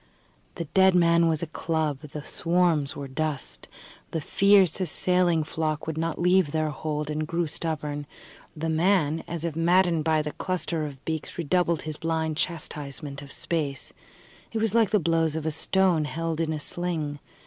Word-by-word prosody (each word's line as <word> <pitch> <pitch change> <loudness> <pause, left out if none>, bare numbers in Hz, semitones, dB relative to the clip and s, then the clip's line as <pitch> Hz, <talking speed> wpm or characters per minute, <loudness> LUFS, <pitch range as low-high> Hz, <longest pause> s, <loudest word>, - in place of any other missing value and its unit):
The 170 - -4
dead 190 -1 +5
man 170 -1 +5
was 160 0 +1
a 160 - -6
club, 155 -4 -1
the 150 0 -8
swarms 165 -4 +1
were 140 - -5
dust. 150 +1 -4 0.4
The 160 - -2
fierce, 195 +2 +4
assailing 180 -1 +2
flock 155 0 -2
would 160 - -3
not 165 0 -2
leave 180 -3 +3
their 155 0 0
hold, 150 +1 -3
and 155 0 -2
grew 170 +1 0
stubborn; 150 -2 -3 0.5
the 160 +2 -2
man, 160 -1 +2
as 170 -1 -4
if 165 -3 -3
maddened 170 -1 +3
by 155 -1 +2
the 150 - -4
cluster 165 -1 -2
of 135 -2 -11
beaks, 160 -1 -4
redoubled 170 0 +1
his 155 -1 -5
blind 160 -1 -1
chastisement 145 -4 -4
of 140 0 -11
space. 150 -5 -2 0.6
It 225 - -3
was 220 -2 +1
like 230 -3 +4
the 215 - +3
blows 165 -3 +1
of 160 -1 -3
a 160 - +1
stone 175 0 +2
held 165 +1 -2
in 160 -1 0
a 155 - -2
sling. 155 -3 -2
160 Hz, 170 wpm, -26 LUFS, 150-175 Hz, 0.6 s, dead